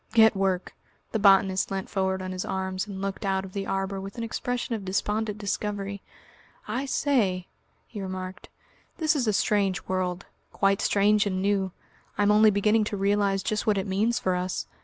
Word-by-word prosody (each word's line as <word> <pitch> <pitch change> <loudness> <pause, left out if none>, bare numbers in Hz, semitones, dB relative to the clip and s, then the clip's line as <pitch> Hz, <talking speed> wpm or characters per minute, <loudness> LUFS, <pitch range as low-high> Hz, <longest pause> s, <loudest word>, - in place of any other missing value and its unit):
"Get 220 -2 +6
work!" 190 -2 0 0.4
The 220 - 0
botanist 195 -1 +4
leant 195 -1 -3
forward 190 -1 -1
on 185 - -4
his 185 0 -3
arms 190 0 -3
and 195 -1 -6
looked 195 +1 -3
out 190 -1 0
of 185 - -11
the 195 -1 -3
arbour 195 0 -2
with 195 +3 -8
an 230 - -3
expression 245 +1 -3
of 215 -3 -3
despondent 210 +3 -1
discovery. 200 -1 -3 0.7
"I 250 +6 -2
say," 210 -11 +1 0.4
he 210 - -8
remarked; 185 +1 -6 0.5
"this 315 -3 +2
is 255 -5 0
a - - +4
strange 195 -1 +1
world 185 0 -2 0.3
quite 195 0 +2
strange 205 +1 +3
and 185 -2 -1
new. 195 -1 +1 0.5
I'm 205 0 +4
only 215 +1 +6
beginning 210 +2 +3
to 210 - -3
realise 200 0 +1
just 215 +2 -1
what 210 -2 +3
it 195 - -1
means 215 +5 +1
for 185 -1 0
us. 180 0 -2
195 Hz, 180 wpm, -26 LUFS, 190-210 Hz, 0.7 s, Get